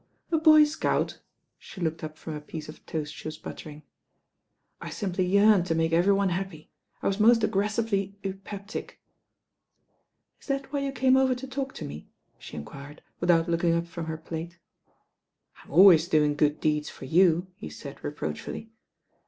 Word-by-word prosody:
"A 325 - +3
boy 310 -1 +8
scout 300 0 -1
I" - - -38 0.4
She - - -12
looked 160 -2 -2
up 155 0 -6
from 160 - -7
a 150 - -6
piece 155 +1 -8
cf 155 - -12
toast 150 -2 -4
she - - -8
was 155 0 -6
buttering. 155 -1 -9 1.0
"I - - -6
simply 185 -3 -2
yearned 200 -1 +5
to 165 - 0
make 165 0 +1
every 175 +4 +4
one 195 -1 +2
happy. 180 -3 -5 0.3
I - - +1
was 195 +1 0
most 230 +1 +5
aggressively 200 -1 0
eupeptic." 195 +1 -6 1.4
"Is - - -20
that 275 0 -3
why 285 - +1
you 275 0 -2
came 260 0 +3
over 265 -1 +3
to 250 +2 -7
talk 270 0 -4
to - - -6
me?" 75 +2 -9 0.3
she - - -10
enquired 140 - -10 0.2
without 170 -1 +3
looking 170 0 +2
up 170 0 0
from 170 -1 -7
her 160 0 -3
plate. 165 +2 -7 1.1
"I'm - - -20
always 170 0 +7
doing 150 -3 +3
good 150 0 +1
deeds 150 -1 0
for - - -10
you," 175 +4 +3
he 75 - -8
said 75 - -10
reproachfully. 80 - -5
175 Hz, 175 wpm, -27 LUFS, 155-210 Hz, 1.4 s, boy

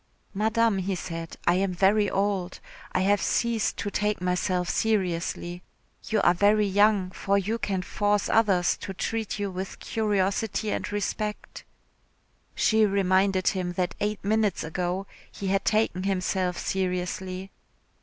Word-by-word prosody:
"Madame," 220 0 +2
he 190 +1 -1
said, 165 -1 -6
"I 175 - +4
am 190 -1 0
very 200 +2 +3
old. 195 -2 -1 0.3
I 185 - +1
have 200 +2 +3
ceased 235 -2 0
to 205 - -3
take 210 +1 0
myself 180 0 0
seriously. 175 -4 -1 0.4
You 215 -2 +1
are - - +5
very 205 +3 +3
young, 200 -1 +3
for 200 +1 0
you 215 +4 -1
can 190 -4 -1
force 205 +2 0
others 195 -6 +3
to 195 - -7
treat 220 +3 -2
you 200 -2 -2
with 185 +1 -5
curiosity 210 0 -1
and - - -3
respect." 210 +1 -4 0.9
She 220 0 +3
reminded 195 -1 +3
him 180 -2 -2
that 180 0 -1
eight 210 -1 -2
minutes 215 -2 +1
ago 180 +4 -2 0.3
he 195 - -4
had 195 0 +1
taken 215 -4 +1
himself 185 -1 -1
seriously. 185 0 -3
195 Hz, 140 wpm, -26 LUFS, 185-210 Hz, 0.9 s, are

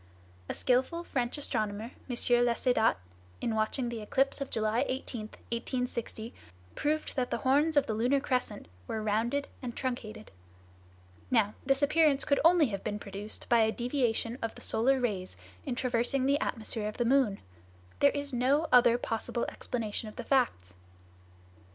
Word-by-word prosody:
A - - -2
skillful 260 +7 +1
French 250 -5 -2
astronomer, 220 -4 -2 0.2
M. 245 - -2 0.3
Laussedat, 240 -1 +3 0.4
in 230 - -1
watching 220 +3 0
the 235 -2 -5
eclipse 270 +6 +1
of 275 - -3
July 220 +3 +1
18, 245 -4 -4 0.2
1860, 235 -1 -3 0.4
probed 305 +1 -1
that 255 -2 0
the - - -1
horns 290 +4 +2
of 280 - +5
the 220 - -2
lunar 245 +6 +2
crescent 250 -6 -2 0.2
were 220 - -3
rounded 230 +7 0
and 245 -3 -6
truncated. 225 -4 -4 1.0
Now, 215 -4 +3
this 270 +1 +2
appearance 300 -1 +4
could 280 - +2
only 335 -1 +6
have 195 -2 -4
been 210 - -2
produced 205 +1 -7
by 235 - +4
a 220 0 +4
deviation 240 -1 -1
of 225 - -3
the - - -12
solar 260 +4 +2
rays 195 - -2 0.3
in - - -1
traversing 255 +1 0
the 280 +1 +3
atmosphere 220 -2 -2
of 210 - -6
the 240 - +1
moon. 245 -5 +3 0.6
There 285 - +6
is 285 -1 -4
no 265 +6 +2
other 240 -1 +6
possible 235 0 -2
explanation 220 -2 -4
of 215 - -14
the - - -5
facts." 100 - +1
245 Hz, 155 wpm, -30 LUFS, 220-270 Hz, 1.0 s, only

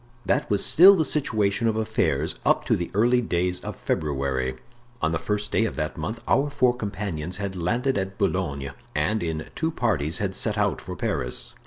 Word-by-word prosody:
That - - +1
was 100 -1 +2
still 190 +4 +8
the 160 -4 +1
situation 110 -7 0
of 110 - +1
affairs 110 0 0
up - - +2
to - - +3
the 85 - -3
early 120 +4 +4
days 90 -4 0
of - - -6
February. 65 -3 -1 0.4
On 80 - 0
the 80 - -1
first 105 +4 -2
day 115 - +2
of 110 - -3
that 75 0 -3
month 115 +1 -4
our 140 +2 +3
four 130 -4 +2
companions 100 -6 -4
had 100 -1 -4
landed 120 +8 0
at 95 0 -4
Boulogne, 70 -1 -1 0.2
and, 105 +9 +1
in 80 -2 -4
two 160 - -1
parties, 95 - 0
had 100 -4 -2
set - - -1
out - - 0
for - - -7
Paris. - - -2
100 Hz, 190 wpm, -25 LUFS, 80-115 Hz, 0.4 s, still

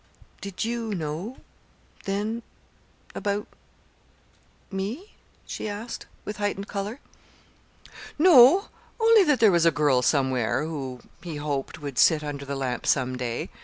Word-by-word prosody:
"Did 200 +1 -4
you 230 -2 -2
know 170 - -4 0.7
then 210 +4 -2 0.7
about 205 0 -2 1.3
me?" 215 - -5 0.3
she 215 - -5
asked, 215 +3 -6 0.2
with 210 - -5
heightened 205 -1 -2
color. 205 +6 -4 1.2
"No, 310 - +7 0.3
only 450 -1 +6
that 295 -5 +3
there 220 -3 +6
was 170 -2 +3
a - - +8
girl 145 -5 +2
somewhere 130 -1 +1
who, 135 -6 -5 0.2
he 170 -3 -6
hoped, 145 -2 -3
would 140 -4 -3
sit 155 -3 +5
under 145 -1 -5
the 140 0 -4
lamp 130 -3 -3
some 130 -1 +2
day. 125 -2 -4
190 Hz, 130 wpm, -26 LUFS, 140-220 Hz, 1.3 s, a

